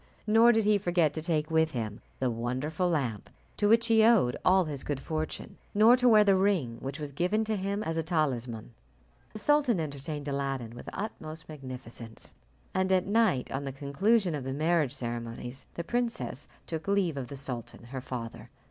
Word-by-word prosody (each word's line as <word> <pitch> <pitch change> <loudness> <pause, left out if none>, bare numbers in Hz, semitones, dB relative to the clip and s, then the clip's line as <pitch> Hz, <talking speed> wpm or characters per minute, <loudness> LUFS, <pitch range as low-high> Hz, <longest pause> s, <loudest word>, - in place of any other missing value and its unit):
Nor 225 +2 +6
did 225 -1 +2
he 210 0 +3
forget 175 -5 +2
to 155 - -3
take 155 -1 -1
with 160 0 +2
him 110 -3 -4 0.2
the 130 -2 0
Wonderful 130 +9 -1
Lamp, 125 - -1 0.3
to 205 - +2
which 230 +1 +5
he 225 -1 +5
owed 220 - +5
all 185 0 +5
his 145 -4 -5
good 145 -2 -2
fortune, 155 +2 -4 0.2
nor 220 +4 +7
to 250 -1 +4
wear 215 -2 +7
the 200 -2 +4
Ring 185 - +1
which 135 +3 -5
was 150 -2 -5
given 180 +9 0
him 200 -1 -1
as 165 -4 -2
a - - +2
talisman. 125 -9 -2 0.6
The - - -6
sultan 280 - +3
entertained 145 -1 -5
Aladdin 135 -4 -2
with 120 - -10
the - - -6
utmost 160 -7 -6
magnificence, 125 -6 -5 0.4
and 190 0 +1
at 185 -1 +3
night, 205 - +2
on 135 +1 -2
the 135 - -4
conclusion 175 - +1
of 145 -3 -3
the 130 +1 -3
marriage 155 -2 +1
ceremonies, 120 +1 -5
the 170 - -3
princess 235 - -2 0.2
took 160 +1 -5
leave 200 -6 +2
of 135 -3 -4
the 140 - -8
sultan 125 -4 -6
her 130 +2 -6
father. 120 -3 -6
155 Hz, 185 wpm, -29 LUFS, 130-200 Hz, 0.6 s, nor